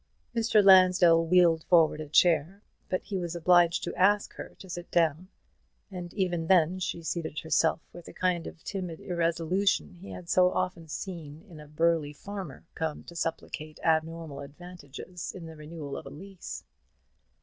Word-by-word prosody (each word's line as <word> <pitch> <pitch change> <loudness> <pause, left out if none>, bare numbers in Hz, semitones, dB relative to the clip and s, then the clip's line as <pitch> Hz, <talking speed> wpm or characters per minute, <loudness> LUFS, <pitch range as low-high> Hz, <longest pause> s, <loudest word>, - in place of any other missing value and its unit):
Mr. 225 -2 +3
Lansdell 185 -3 +6
wheeled 170 -2 +4
forward 160 -3 +4
a 150 - -8
chair, 175 +5 +3 0.3
but 185 - -1
he 195 -3 -4
was 175 -1 -4
obliged 175 0 +4
to - - -3
ask 205 +2 +2
her - - -9
to 190 - -12
sit 175 -1 -7
down; 165 +1 +1 0.6
and 175 -2 -7
even 175 -5 -1
then 180 0 +3
she 170 -2 -4
seated 160 -2 -4
herself 160 +1 +2
with 175 - -11
the - - -11
kind 180 -2 -1
of 165 - -11
timid 180 -5 -5
irresolution 175 +3 0
he 180 +2 -12
had 175 - -9
so 180 +1 +4
often 170 -3 -2
seen 160 -2 -7
in 165 -5 -12
a 150 - -12
burly 155 -1 +1
farmer 190 -3 -8
come 160 -2 -4
to 170 - -12
supplicate 155 -2 -5
abnormal 160 -2 0
advantages 170 +3 -9
in 175 -3 -8
the 160 0 -10
renewal 150 -2 -8
of - - -7
a - - -7
lease. 190 +3 -9
170 Hz, 165 wpm, -28 LUFS, 160-185 Hz, 0.6 s, Lansdell